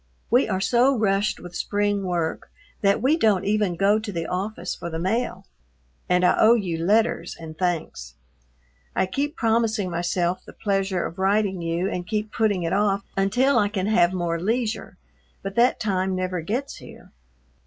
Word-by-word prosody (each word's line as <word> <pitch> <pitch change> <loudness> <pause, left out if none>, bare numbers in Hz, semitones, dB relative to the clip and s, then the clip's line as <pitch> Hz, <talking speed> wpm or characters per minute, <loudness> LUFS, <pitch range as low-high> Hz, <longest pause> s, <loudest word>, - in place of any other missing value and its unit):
We 245 0 +4
are 190 -2 0
so 245 +6 +3
rushed 205 -1 +1
with 175 0 -10
spring 205 0 0
work 175 -3 -2 0.3
that 200 +2 +2
we 280 +5 +4
don't 210 - +2
even 205 -3 +1
go 200 +4 +3
to 215 -1 -6
the 165 -3 -3
office 185 0 -3
for 170 - -6
the 160 - -4
mail, 190 +2 -2 0.6
and 180 0 +3
I - - +4
owe 225 +2 +7
you 175 -7 -2
letters 210 -2 +1
and 160 -1 -9
thanks. 160 - -3 0.8
I - - +2
keep 280 - -2
promising 225 -4 +1
myself 175 +1 -1
the - - -13
pleasure 195 -3 -1
of 175 - -7
writing 195 -1 +1
you 170 +2 -1
and 180 -2 -4
keep 215 0 -3
putting 210 -6 +1
it 165 - -1
off 200 0 +1
until 245 +8 +2
I 205 - +3
can 195 -3 -2
have 180 -5 +3
more 170 -2 -2
leisure, 225 +4 -2 0.5
but 195 0 -4
that 240 +2 +4
time 190 -3 0
never 185 -1 -2
gets 245 - -3
here. - - -14
195 Hz, 175 wpm, -24 LUFS, 180-215 Hz, 0.8 s, owe